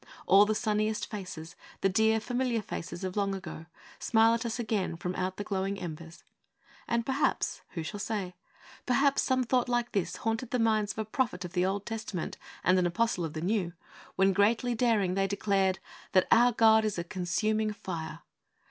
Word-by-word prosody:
All 200 +2 +6
the 215 - +1
sunniest 215 -1 0
faces 180 -6 -7 0.3
the - - +4
dear, 220 +3 +3
familiar 245 -1 -1
faces 175 0 -6
of 185 -1 -3
the 210 - -1
long 195 -1 0
ago 160 -4 -8 0.3
smile 225 0 +4
at 230 0 -1
us 225 - -3
again 210 -7 -1
from 180 +2 -3
out 185 +1 -3
the 205 - -3
glowing 195 0 -2
embers. 165 -1 -8 0.6
And 235 0 0
perhaps 270 +2 0
who 165 - -2
shall 205 +6 -6
say? 200 -4 -3 0.5
perhaps 275 +2 +3
some 260 -1 +1
thought 250 0 +1
like 240 0 0
this 195 -5 -1
haunted 225 +2 -2
the 250 - 0
minds 215 -3 +2
of - - -25
a 220 - -2
prophet 220 -5 -1
of 175 - -8
the 180 0 +2
Old 200 +1 -2
Testament 215 -6 -4 0.3
and 185 +1 +4
an 180 - +2
apostle 180 +1 0
of 160 -2 -4
the 155 - -4
New 180 -2 0 0.4
when, 195 0 +3
greatly 225 +5 +2
daring, 220 -6 +2
they 195 +1 +1
declared 195 -2 +1 0.4
that 185 - +4
'our 240 +2 +6
God 220 0 +5
is 215 -3 -1
a 170 - -1
consuming 210 +4 -1
fire!' 170 -6 -6
205 Hz, 190 wpm, -30 LUFS, 185-225 Hz, 0.6 s, All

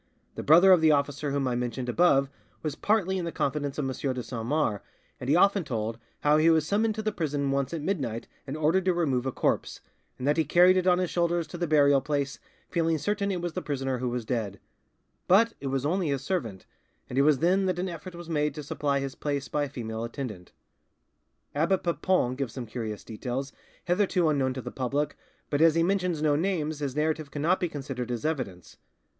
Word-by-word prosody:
The - - -5
brother 175 +6 +7
of 180 -3 +6
the 160 -1 +5
officer 145 0 0
whom 140 -1 0
I 125 - 0
mentioned 125 +1 -3
above 135 0 +3 0.4
was 155 -2 -2
partly 190 +1 +1
in 175 - -3
the 170 - -3
confidence 140 -1 -2
of 150 - -1
M. 135 - -1 0.2
de 125 - -4
Saint 115 -2 -5
Mars, 130 -8 0 0.4
and 125 - -5
he 150 - +5
often 195 +1 +4
told 115 -4 -3 0.2
how 150 +1 +4
he 160 +2 +5
was 160 -2 +3
summoned 215 +4 +1
to 220 - -4
the 215 - 0
prison 145 -6 -1
once 140 -1 0
at 165 -3 -4
midnight 135 - -2 0.2
and 135 +3 -4
ordered 165 +5 +2
to 185 -2 +2
remove 135 -7 0
a - - 0
corpse, - - -1 0.4
and 130 - -3
that 145 - +3
he 160 - +4
carried 175 +5 +5
it 185 0 +1
on 180 -1 +5
his 180 -1 -1
shoulders 170 -1 +1
to 175 - -8
the 175 - 0
burial 145 -2 +4
place, 140 0 -2 0.3
feeling 165 -2 +1
certain 205 +5 -1
it 185 -3 -2
was 175 -2 -3
the - - -3
prisoner 135 -3 -2
who 125 0 -1
was 120 -1 -3
dead; 110 -5 -3 0.7
but 225 +5 +5
it 140 - -5
was 135 0 -1
only 175 +3 +1
his 140 -2 -1
servant, 115 - -3 0.4
and 130 - -1
it - - +6
was 150 0 +4
then 185 +6 +2
that 185 -1 0
an 180 +2 -1
effort 175 +1 -7
was 170 -1 -9
made 150 -3 0
to 150 - -6
supply 145 -2 -1
his 135 -1 -4
place 140 -2 -3
by 145 +4 0
a - - -8
female 110 -2 -5
attendant." 115 -7 -6 1.0
Abbe 165 +6 +2
Papon 175 -6 +1
gives 135 -4 -3
some 125 -3 -5
curious 110 -2 -5
details, 125 +5 -5 0.3
hitherto 180 -2 +2
unknown 135 -3 +1
to 130 - -4
the - - -6
public, 140 +3 -1 0.4
but 145 +1 +1
as 165 -1 +6
he 165 - +3
mentions 180 -4 0
no 150 -2 +3
names 155 -3 -1
his 140 -3 -3
narrative 155 -1 -1
cannot 160 +6 +1
be 180 -2 -1
considered 135 -4 -5
as 120 +1 -3
evidence. 120 - -4
150 Hz, 220 wpm, -27 LUFS, 130-175 Hz, 1.0 s, brother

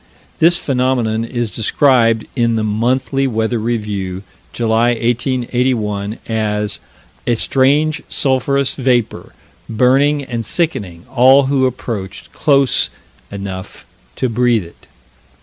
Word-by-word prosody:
This 170 +2 +5
phenomenon 125 -5 0
is 120 -1 -3
described 115 -1 +2
in 115 -3 +1
the 110 - 0
Monthly 125 +5 0
Weather 110 -1 -1
Review, 105 -5 -3 0.3
July, 115 +1 +1
1881, 120 -3 -1
as 105 -2 -1 0.5
"a 120 - +3
strange 145 +6 +2
sulphurous 140 0 +1
vapor... 125 -4 -1 0.4
burning 135 +5 +2
and 120 -3 -4
sickening 100 - -2
all 130 +2 +6
who 135 -1 +2
approached 115 -6 -6
close 140 -3 +2 0.4
enough 95 -2 -7 0.3
to 130 - -1
breathe 120 -2 +1
it." 85 - -17
120 Hz, 105 wpm, -16 LUFS, 110-130 Hz, 0.5 s, all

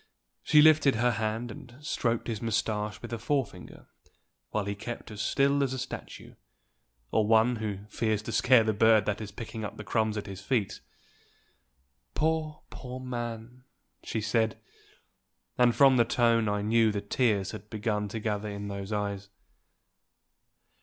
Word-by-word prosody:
She 150 -1 +5
lifted 155 -4 +5
her 120 +2 +2
hand, 110 +2 -2
and 120 +3 -12
stroked 120 -5 -1
his 110 -3 -3
mustache 110 -2 -1
with 120 - -6
a 115 - -3
forefinger, 115 -7 -3 0.6
while 105 -2 -2
he 100 - -2
kept 115 +3 -7
as 105 - -5
still 140 +1 +2
as 135 -2 0
a - - -3
statue, 130 +1 -7 0.8
or 110 -1 +2
one 115 +2 +4
who 105 -2 -4
fears 110 -1 -1
to - - -5
scare 125 -2 +5
the 110 0 +1
bird 110 +1 +4
that 105 +1 -2
is 105 -1 -6
picking 110 +1 -7
up 105 - -6
the 105 - -7
crumbs 110 0 0
at 105 - -4
his 100 -1 -8
feet. 105 -1 -1 1.3
"Poor, 155 -1 -1
poor 130 -1 -7
man!" 120 -1 -6 0.4
she 110 - -3
said; 110 0 0 1.0
and 120 -1 +4
from 135 -2 +6
the 120 - +6
tone 115 -2 +2
I 105 0 -1
knew 110 +1 +3
the 100 -1 -3
tears 100 -2 0
had 105 +3 -10
begun 105 -1 -2
to 110 +3 -5
gather 105 -1 -2
in 100 0 -5
those 100 0 -6
eyes. 100 -1 -3
110 Hz, 160 wpm, -29 LUFS, 105-125 Hz, 1.3 s, from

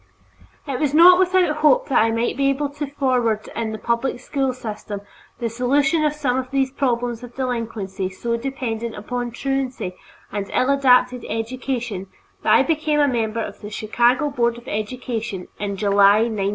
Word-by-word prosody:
It 275 -4 -3
was 295 -1 0
not 360 +3 +8
without 365 -4 +3
hope 310 +12 +4
that 270 - +4
I 225 - +3
might 230 +1 0
be 275 +1 +2
able 280 +1 0
to 290 +1 -5
forward 250 -6 0
in 225 -1 -2
the 220 - -4
public 235 +3 -1
school 270 +1 -1
system 210 -4 -6 0.4
the 235 - -2
solution 275 +7 +1
of 300 -1 +2
some 265 -4 0
of 255 0 -5
these 270 -1 0
problems 245 -4 -1
of 245 -1 -11
delinquency 225 -7 -3
so 235 +5 -3
dependent 235 -3 -4
upon 245 +3 -4
truancy 260 -5 -3 0.4
and 200 -1 -4
ill 255 +2 +3
adapted 250 -3 +3
education 230 -3 -3 0.3
that - - +1
I - - +6
became 310 -2 0
a 290 - +4
member 230 -3 -1
of 200 - -8
the 205 - -7
Chicago 240 +7 +1
Board 235 -3 0
of 240 +2 -14
Education 215 -3 -4
in 200 -1 -3
July, 200 +1 +5
1905. 210 -4 -1
245 Hz, 175 wpm, -21 LUFS, 220-275 Hz, 0.4 s, not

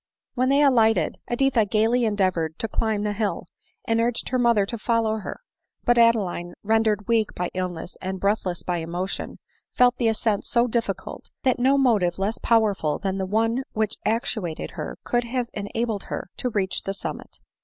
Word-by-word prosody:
When 255 +1 +1
they 280 +2 +4
alighted, 225 - +3
Editha 245 -1 +2
gaily 225 +4 +2
endeavored 185 -7 0
to 225 - -2
climb 215 -1 -1
the 210 0 -1
hill, 210 0 -2 0.4
and 225 0 +2
urged 235 0 -1
her 255 - 0
mother 235 -4 +4
to 230 +3 -5
Mow 225 -1 +2
her; 210 - -7 0.4
but 240 0 +4
Adeline, 195 -7 +2
rendered 215 -1 +1
weak 225 -2 +1
by 180 - -2
illness 180 -2 -4
and 190 0 -4
breathless 195 -3 0
by 180 -1 -1
emotion, 175 +3 -4 0.4
felt 250 0 +4
the 235 - +1
ascent 220 -2 +1
so 235 0 +3
difficult, 235 -1 -3
that 255 -2 +2
no 265 +3 +4
motive 210 -10 +2
less 200 +4 -1
powerful 205 -9 +2
than 195 0 -2
the 190 - -2
one 225 +5 +1
which 215 -1 -1
actuated 215 -6 -2
her - - -6
could 240 0 0
have 245 0 -2
enabled 215 0 -3
her - - -5
to 250 - -1
reach 200 -4 -1
the 195 - -4
summit. - - -7
220 Hz, 175 wpm, -24 LUFS, 195-235 Hz, 0.4 s, they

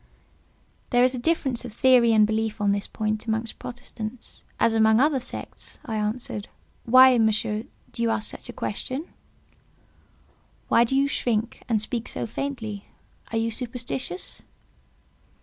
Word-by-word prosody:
"There 245 -1 +4
is 255 +1 +4
a 250 - -3
difference 265 -4 0
of 240 -3 -8
theory 245 -1 +5
and 215 -1 +6
belief 220 0 -1
on 205 -1 +2
this 200 0 -1
point 215 0 -2
amongst 220 +1 -2
Protestants 240 -1 -8 0.2
as 230 - +3
amongst 220 0 +5
other 295 -2 +2
sects," 250 - -7
I 225 - -3
answered. 210 -1 -3 0.4
"Why, 255 +1 +7
Monsieur, 215 0 +1 0.3
do - - -6
you 230 - +2
ask 220 -1 0
such - - -11
a - - -3
question?" 280 +6 -4 1.6
"Why 235 - +6
do 265 - -1
you 275 +1 +4
shrink 235 -4 -1
and 225 -2 +3
speak 230 +2 -4
so - - -4
faintly? 225 -4 -5 0.4
Are 225 - 0
you 225 0 0
superstitious?" 250 +8 -3
230 Hz, 150 wpm, -25 LUFS, 220-255 Hz, 1.6 s, Why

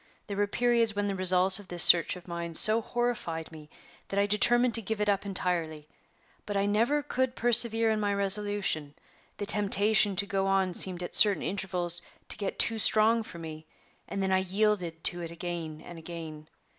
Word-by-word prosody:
There 200 - -7
were 205 0 0
periods 235 -1 +1
when 205 0 -2
the 200 - -3
results 185 +1 +3
of 205 - -14
this 175 -2 0
search 170 0 +5
of 180 0 -14
mine 170 -1 -6
so 215 +6 +8
horrified 225 -10 -4
me 155 -2 -14 0.4
that 195 - -6
I 200 - +2
determined 240 +4 +2
to 230 - +3
give 220 +1 -5
it 210 - -2
up 200 0 -1
entirely; 165 -5 -4 0.6
but 205 -1 -3
I 200 - 0
never 230 +8 0
could 260 -3 -3
persevere 230 -1 +4
in 215 - -2
my 205 -1 -2
resolution; 200 -7 -1 0.4
the 205 - -5
temptation 205 0 +2
to 200 - 0
go 195 -1 -2
on 190 -2 0
seemed 180 0 0
at 175 - -8
certain 205 -2 +4
intervals 175 -3 -2 0.3
to - - -2
get 200 - -5
too 225 -1 +2
strong 220 +2 +3
for 220 -6 -11
me, 160 -1 -10 0.4
and 195 - -5
then 190 - -2
I 190 - +2
yielded 190 -3 -2
to 175 -1 -1
it 170 - -7
again 170 -2 -7
and 175 -1 -11
again. 160 -2 -10
195 Hz, 195 wpm, -27 LUFS, 175-215 Hz, 0.6 s, so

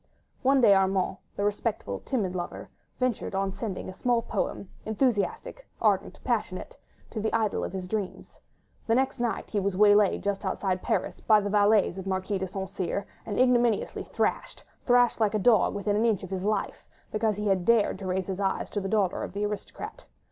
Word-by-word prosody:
One 270 +1 +4
day 210 -4 +7
Armand, 190 0 +2 0.2
the 200 - -1
respectful, 205 - -2
timid 200 -8 -2
lover, 175 -1 -5 0.3
ventured 250 -5 -1
on 195 0 0
sending 210 -4 -5
a 185 - -6
small 240 +3 +1
poem—enthusiastic, 220 - -2
ardent, 200 -3 +1
passionate—to 220 - -4
the 220 - 0
idol 220 -2 0
of - - -3
his 185 -1 -5
dreams. 205 -1 -5 0.5
The 225 - +3
next 265 +1 +1
night 240 -2 -2
he 210 - +1
was 195 -1 -1
waylaid 205 -1 +5
just 200 0 -1
outside 190 -1 -1
Paris - - -1
by 215 -1 +5
the 205 -1 -3
valets 205 -2 +3
of 190 - -7
the - - -3
Marquis 190 +1 -1
de 190 - -2
St. 190 +1 -5
Cyr, 185 +2 -3 0.2
and 210 - -3
ignominiously 240 -3 +2
thrashed—thrashed 245 -1 0
like 215 -1 +2
a - - +4
dog 215 -1 +4
within 205 0 0
an 220 +3 +3
inch 215 -5 +1
of 190 - -8
his 190 0 -3
life—because 215 +1 -2
he 210 +1 -4
had 190 -3 +2
dared 225 -2 +3
to 190 - -5
raise 185 0 -1
his 190 0 -4
eyes 195 -1 -1
to 205 - -2
the 195 - -3
daughter 200 -4 +1
of - - -6
the 205 +1 -1
aristocrat. 210 -1 -6
205 Hz, 185 wpm, -27 LUFS, 190-225 Hz, 0.5 s, day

